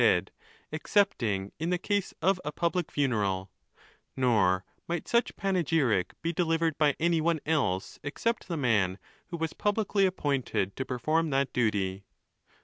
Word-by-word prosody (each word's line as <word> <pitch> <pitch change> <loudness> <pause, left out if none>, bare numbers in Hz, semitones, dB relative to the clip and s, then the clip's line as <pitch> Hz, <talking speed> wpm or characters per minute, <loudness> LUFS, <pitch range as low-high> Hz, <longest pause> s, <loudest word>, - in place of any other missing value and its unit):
dead - - +3 0.4
excepting 120 - +1
in 165 +2 -1
the 180 - +2
case 200 +2 -1
of 185 0 +3
a 150 - -3
public 170 +2 -1
funeral, 100 -9 0 0.7
nor 100 -8 +3 0.2
might 170 -1 -3
such 235 0 +1
panegyric 160 - +1
be 170 +1 0
delivered 165 -2 +1
by 150 -3 +4
any 165 0 +2
one 165 0 +1
else 130 -12 0
except 230 +11 -2
the 170 - -2
man 105 -9 +2 0.3
who 170 - -5
was 165 -1 -2
publicly 205 -1 +1
appointed 140 - -1
to 130 - -2
perform 155 +6 0
that 135 -1 0
duty. 100 -5 0
150 Hz, 145 wpm, -29 LUFS, 110-170 Hz, 0.7 s, by